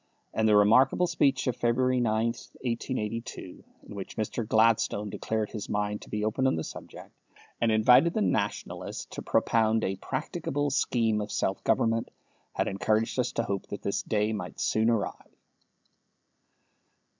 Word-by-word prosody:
And 110 0 +2
the 105 - +5
remarkable 130 +11 +5
speech 140 -6 +1
of 125 - 0
February 125 +2 +1
9, 110 -1 +1
1882, 115 -4 -5 0.2
in - - -11
which 100 -2 -7
Mr. 110 +1 -2
Gladstone 110 -2 +2
declared 110 +1 -2
his 105 -3 -6
mind 105 0 -1
to - - -12
be 105 0 -2
open 130 +5 +1
on - - +2
the 80 - -2
subject, - - -10 0.5
and 115 -1 +3
invited 125 +9 +5
the 220 - +1
Nationalists 105 - -2
to - - -6
propound 110 -1 +2
a 95 0 -1
practicable 145 - -3
scheme 115 -5 +1
of 105 - -5
self 95 - -1
government, 115 0 +1 0.4
had - - -1
encouraged 110 +5 0
us 125 0 +1
to 115 - 0
hope 100 -3 -3
that 100 - -7
this 100 - -1
day 105 0 0
might 90 -4 -6
soon 110 +1 +2
arrive. 115 -4 -3
110 Hz, 155 wpm, -28 LUFS, 105-125 Hz, 0.5 s, the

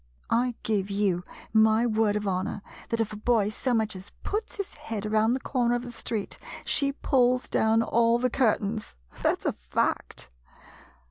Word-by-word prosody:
I 240 +1 +2
give 205 -3 0
you 195 -3 +1 0.3
my 220 +1 +5
word 215 -2 +2
of 210 0 -1
honor 190 +2 -2 0.3
that 230 - 0
if 220 -1 0
a - - -6
boy 215 -2 +2
so 250 +4 -2
much 220 -3 +1
as 185 +1 -8
puts 430 +2 -3
his 400 -2 -5
head 215 -2 -5
around 215 +3 +2
the - - -2
corner 245 -2 +1
of 245 - -2
the 245 - -7
street, 225 -3 -4 0.3
she 280 -1 +2
pulls 255 -2 +2
down 225 +1 +3
all 230 +1 +3
the 250 0 0
curtains. 215 -4 0 0.3
That - - +1
's - - -15
a - - +1
fact. - - -2
225 Hz, 180 wpm, -27 LUFS, 210-245 Hz, 0.3 s, my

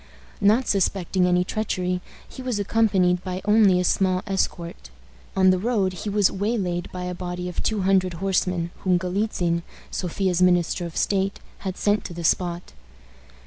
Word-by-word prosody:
Not 220 +6 +4
suspecting 190 -2 +1
any 180 0 +3
treachery, 180 -3 -2 0.3
he 260 - -10
was 250 -4 -2
accompanied 195 -4 +2
by 185 0 -4
only 210 -3 +5
a - - +1
small 185 0 +1
escort. 170 - -3 0.5
On 190 0 +6
the 185 - +1
road 200 -3 0
he 185 +4 -5
was 205 -1 +3
waylaid 195 -4 -2
by 180 0 -5
a 180 0 -3
body 180 0 -5
of 180 - -4
two 215 -3 0
hundred 185 -1 +2
horsemen, 180 -2 0
whom 185 -2 +2
Galitzin, 180 -2 -1 0.3
Sophia's 180 0 -1
minister 175 -1 +2
of 165 - -9
state, 195 0 0 0.2
had 190 -1 -5
sent 205 0 +1
to 175 - -7
the 170 - -6
spot. 175 - 0
185 Hz, 160 wpm, -24 LUFS, 180-200 Hz, 0.5 s, On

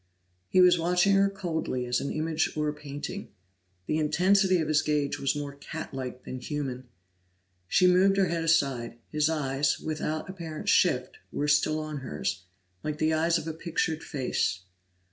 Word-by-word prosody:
He 185 - +5
was 180 -1 +6
watching 180 +3 +3
her 195 0 +4
coldly 165 -10 -3
as 125 0 0
an 140 - -3
image 155 0 -1
or 150 0 +1
a 150 - -1
painting; 150 +7 -7 0.6
the 155 - 0
intensity 185 +5 +3
of 160 -3 -1
his 150 -1 +3
gaze 150 -2 0
was 135 - 0
more 145 -1 -4
cat 140 - -7
like 130 -1 -5
than 130 - -6
human. 130 -3 -4 0.8
She 185 - +4
moved 185 +2 +5
her 195 - +4
head 170 -2 -1
aside; 135 -8 +1
his 155 0 +2
eyes, 140 -3 0
without 155 0 -3
apparent 165 -5 -5
shift, - - +2
were 145 - -1
still 150 +1 +3
on 155 -1 -4
hers, 95 - -4 0.4
like 150 -1 -3
the 155 +1 +1
eyes 165 +2 +2
of 165 - -5
a 160 - -2
pictured 160 0 -2
face. 130 - -1
155 Hz, 170 wpm, -28 LUFS, 140-170 Hz, 0.8 s, was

